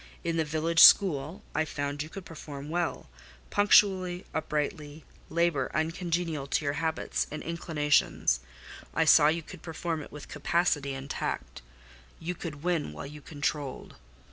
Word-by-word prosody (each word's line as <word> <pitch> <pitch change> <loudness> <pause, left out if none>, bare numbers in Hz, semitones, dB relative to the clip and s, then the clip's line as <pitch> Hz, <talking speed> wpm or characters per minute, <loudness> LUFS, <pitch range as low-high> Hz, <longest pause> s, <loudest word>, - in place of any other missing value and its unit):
In 170 -1 -1
the 160 - +2
village 160 +2 0
school 160 -3 +6
I 155 - +1
found 145 -1 -3
you 155 - -5
could 195 +2 -9
perform 145 -3 -8
well, 170 - -2 0.4
punctually, 190 -3 +4
uprightly, 150 -1 -3 0.2
labour 165 -5 +1
uncongenial 165 -2 -1
to 145 - 0
your 140 - +1
habits 160 +1 -1
and 155 - -6
inclinations; 150 - +1 0.6
I 160 - +3
saw 150 -1 +7
you 165 +2 +1
could 180 +1 -11
perform 165 -1 -3
it - - -11
with 150 -1 -9
capacity 150 -2 0
and 135 +1 -7
tact: - - -4 0.6
you 170 +2 -3
could 160 -4 -7
win 170 - 0
while 75 - -7
you 150 +1 -10
controlled. 145 -2 -4
155 Hz, 145 wpm, -29 LUFS, 145-170 Hz, 0.6 s, saw